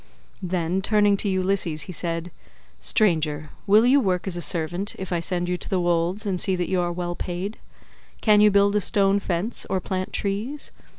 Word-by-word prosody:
Then 180 0 -1
turning 205 0 +3
to 200 - -1
Ulysses 185 -5 0
he 185 - -8
said, 165 0 -3 0.5
"Stranger, 155 -7 +1 0.2
will 210 +3 +6
you 265 +3 +5
work 185 -7 0
as 190 -3 -3
a 175 - -4
servant, 175 +4 -1
if 190 -1 -5
I 170 - +1
send 175 +1 -1
you 180 0 -1
to - - -7
the 190 - +1
wolds 175 +4 0
and 190 -3 -1
see 190 +1 +1
that 180 -1 -2
you 185 -1 +1
are 175 0 -1
well 175 0 -3
paid? 180 +4 -5 0.6
Can 210 -2 +4
you 210 - +7
build 200 0 +3
a 210 - +2
stone 200 0 +3
fence, 190 +4 -2
or 190 - 0
plant 185 0 -4
trees? 215 +9 -3
185 Hz, 195 wpm, -24 LUFS, 175-200 Hz, 0.6 s, you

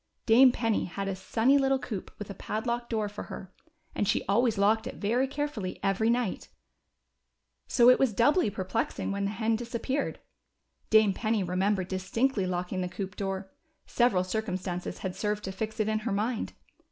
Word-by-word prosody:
Dame 250 +3 +7
Penny 225 -3 0
had 195 +3 -4
a 195 - -2
sunny 235 +8 +2
little 270 0 +3
coop 220 -7 -6
with 210 - -6
a - - -5
padlocked 235 +5 -3
door 220 -2 0
for 205 0 -7
her, 190 -1 -9 0.4
and 205 - -1
she 205 - +1
always 225 +3 +2
locked 220 +3 +3
it - - -6
very 240 +6 +1
carefully 275 -9 -4
every 195 +3 +2
night. 235 -4 -1 1.2
So 240 -1 +4
it 250 - +7
was 265 -4 +3
doubly 265 - +3
perplexing 200 +2 -2
when 200 0 -1
the - - 0
hen 220 +2 0
disappeared. 240 +4 -3 0.7
Dame 215 -2 +5
Penny 215 0 0
remembered 185 +1 0
distinctly 195 +3 0
locking 180 +1 -2
the 180 - -2
coop 190 0 -5
door; 195 -1 -4 0.3
several 230 -7 +2
circumstances 185 -3 -3
had 185 -2 -4
served 210 0 -2
to 190 - -4
fix 215 +3 -5
it 215 - +1
in 215 0 +1
lier 230 +2 -3
mind. 220 +4 -1
215 Hz, 175 wpm, -29 LUFS, 190-235 Hz, 1.2 s, Dame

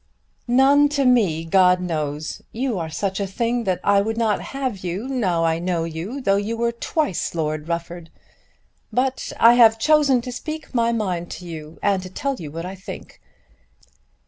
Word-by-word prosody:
"None 275 +4 +5
to 275 - +2
me, 195 -11 +3
God 180 +1 +4
knows. 155 -4 -3
You 240 -4 -2
are 160 -1 -4
such 190 +4 -2
a 200 - -1
thing 235 +4 -1
that 185 -2 0
I 200 0 +4
would 225 +2 -2
not 220 -3 +1
have 260 -8 -4
you 185 +7 -3
now 195 -11 0
I 165 0 +1
know 175 -1 -1
you, 165 - -5
though 195 -5 +2
you 215 +3 -2
were 235 0 +1
twice 235 - -2
Lord 155 -1 -2
Rufford. 170 0 -4 0.8
But 260 +1 -1
I 230 +1 +8
have 225 -2 +6
chosen 290 0 +4
to 250 +1 -6
speak 310 +4 -7
my 235 -1 +2
mind 185 -7 -2
to 180 - -9
you 160 -2 -8
and 200 -2 +2
to 185 - -8
tell 275 +9 -2
you 155 -4 -7
what 165 +3 -6
I 185 - -5
think. 190 0 -10
200 Hz, 180 wpm, -22 LUFS, 170-245 Hz, 0.8 s, I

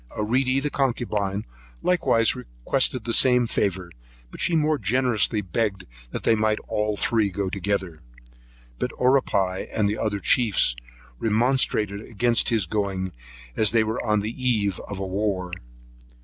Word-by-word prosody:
Aeredy, 130 +5 +1
the 145 +1 -2
concubine, 105 -7 -1 0.4
likewise 115 - +2
requested 105 - -1
the 115 - -1
same 125 0 +5
favour; 95 -5 -2 0.4
but - - -9
she 170 - +2
more 155 -1 +2
generously 115 -2 +1
begged 95 0 -2 0.3
they - - +1
might 110 -1 +1
all 105 0 -1
three 110 +1 +1
go 95 0 -3
together. 95 -4 -3 0.8
But - - -1
Oripai, 110 -8 +1
and 105 -2 +1
the 105 +2 -2
other 105 -2 -1
chiefs, 105 - +3 0.4
remonstrated 110 -3 +1
against 115 +1 +1
his 110 -5 +1
going, 95 -1 -2 0.4
as 110 - +4
they 115 -1 +4
were 110 +2 -3
on 105 -3 +1
the 105 +2 -3
eve 110 -7 0
of 100 - -6
a 95 - -3
war. 95 -1 -2
105 Hz, 140 wpm, -24 LUFS, 100-120 Hz, 0.8 s, same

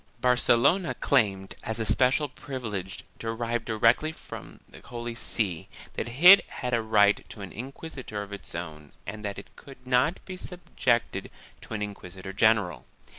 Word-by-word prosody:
Barcelona 125 +8 +3
claimed, 100 -8 +1
as 110 +1 -4
a 110 - 0
special 130 +6 +3
privilege, 110 -9 -6 0.2
derived 115 +1 -2
directly 115 +8 +3
from 160 - -11
the - - -14
Holy 120 -1 -6
See, 105 -7 -2 0.2
that - - -3 0.2
it 195 +3 +11
had 125 -1 -4
a 115 - +3
right 105 -2 +4
to 105 - -9
an 100 - -7
inquisitor 130 -3 -6
of 100 0 -10
its 100 - -8
own 75 -4 -7
and 105 +1 -7
that 100 -1 -4
it 100 - -11
could 135 -2 -14
not 130 +7 +2
be 185 -1 -7
subjected 125 - -1 0.3
to - - -7
an 105 - -2
inquisitor 95 -2 -7
general. 105 -3 +2
115 Hz, 155 wpm, -27 LUFS, 100-125 Hz, 0.3 s, it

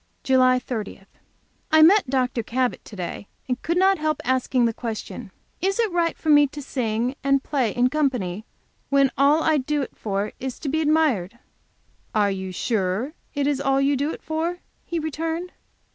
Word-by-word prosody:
JULY 255 -1 +4
30. 225 -6 -5 0.7
I 315 0 +7
met 380 -2 +5
Dr. 250 -2 0
Cabot 250 +3 -1
to 210 - -11
day, 185 +2 -6 0.2
and 250 -1 -2
could 340 +1 -1
not, 385 0 +4
help 310 -1 0
asking 255 -1 +2
the 230 - +1
question: 225 -1 -6 0.3
"Is 390 +2 0
it 450 -4 +2
right 340 -1 0
for 315 - -4
me 290 -1 +7
to 295 +2 -9
sing 240 -1 -1
and 275 0 +2
play 265 -6 0
in 245 +4 +2
company 250 -10 -1 0.5
when 275 -1 +4
all 290 +3 +4
I 315 -2 +3
do 290 +2 -1
it - - -9
for 205 0 -2
is 260 -1 -5
to 285 - -3
be 315 +3 0
admired?" 295 - +1 0.8
"Are 205 -2 +3
you 190 -1 -4
sure 205 - -1 0.2
it 285 -1 0
is 280 -1 0
all 270 -1 +2
you 275 +1 +2
do 285 +3 0
it - - -9
for?" 325 +3 -2 0.3
he 340 - -3
returned. 325 +3 -3
270 Hz, 180 wpm, -23 LUFS, 235-310 Hz, 0.8 s, I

